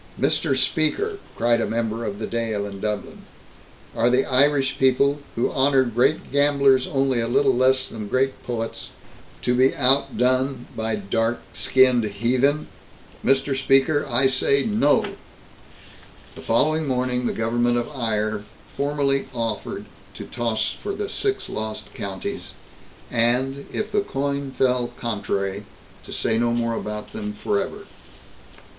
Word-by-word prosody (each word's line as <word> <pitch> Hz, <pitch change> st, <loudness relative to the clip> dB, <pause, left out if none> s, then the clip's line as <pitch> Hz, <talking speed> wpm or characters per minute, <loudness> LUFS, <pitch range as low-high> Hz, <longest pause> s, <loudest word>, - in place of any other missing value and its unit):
"Mr. -, -, +1 dB
Speaker!" 415 Hz, 0 st, 0 dB, 0.2 s
cried 120 Hz, 0 st, +2 dB
a -, -, 0 dB
member 115 Hz, 0 st, -2 dB
of 100 Hz, -2 st, -4 dB
the 110 Hz, -, -4 dB
Dail 115 Hz, -3 st, -2 dB
in 100 Hz, -1 st, -7 dB
Dublin. 105 Hz, 0 st, -4 dB, 0.7 s
"Are 115 Hz, +1 st, +3 dB
the 125 Hz, +2 st, +3 dB
Irish 135 Hz, +1 st, +2 dB
people, 140 Hz, +2 st, +3 dB, 0.2 s
who 115 Hz, -, 0 dB
honor 135 Hz, 0 st, +3 dB
great 120 Hz, 0 st, 0 dB
gamblers 140 Hz, -2 st, +3 dB
only 135 Hz, -2 st, +1 dB
a 115 Hz, -, -1 dB
little 135 Hz, +2 st, +3 dB
less 130 Hz, +1 st, +2 dB
than 110 Hz, -2 st, -7 dB
great 130 Hz, +4 st, 0 dB
poets, 115 Hz, -2 st, -4 dB, 0.5 s
to 125 Hz, -, +2 dB
be 130 Hz, +2 st, +3 dB
outdone 130 Hz, 0 st, +2 dB
by 110 Hz, -1 st, -1 dB
dark 115 Hz, +3 st, -1 dB
skinned 125 Hz, +3 st, +4 dB
heathen? 125 Hz, +8 st, +1 dB, 0.6 s
Mr. 135 Hz, +1 st, +2 dB
Speaker, 135 Hz, +3 st, +3 dB
I 125 Hz, +2 st, +3 dB
say 135 Hz, +1 st, +3 dB
no!" 210 Hz, -9 st, +3 dB, 1.3 s
The -, -, -11 dB
following 155 Hz, +6 st, +1 dB
morning, 125 Hz, -1 st, 0 dB
the -, -, 0 dB
government 120 Hz, +2 st, +1 dB
of 120 Hz, -, -2 dB
Eire 110 Hz, -3 st, -1 dB, 0.3 s
formally 140 Hz, -1 st, 0 dB
offered 115 Hz, -3 st, -3 dB, 0.3 s
to -, -, -7 dB
toss 110 Hz, -3 st, -1 dB
for 400 Hz, -, -5 dB
the 410 Hz, 0 st, -4 dB
Six 400 Hz, -2 st, -2 dB
Lost 110 Hz, 0 st, -5 dB
Counties 95 Hz, -2 st, -6 dB, 0.6 s
and, 125 Hz, +4 st, +1 dB
if 215 Hz, 0 st, -3 dB
the 205 Hz, 0 st, +2 dB
coin 140 Hz, -5 st, -2 dB
fell 125 Hz, -2 st, 0 dB
contrary, 100 Hz, -3 st, -3 dB, 0.4 s
to -, -, -10 dB
say 110 Hz, 0 st, 0 dB
no 120 Hz, 0 st, +2 dB
more 115 Hz, -1 st, 0 dB
about 105 Hz, -1 st, -5 dB
them 105 Hz, -1 st, -4 dB
forever. 100 Hz, -1 st, -2 dB
125 Hz, 140 wpm, -23 LUFS, 115-135 Hz, 1.3 s, skinned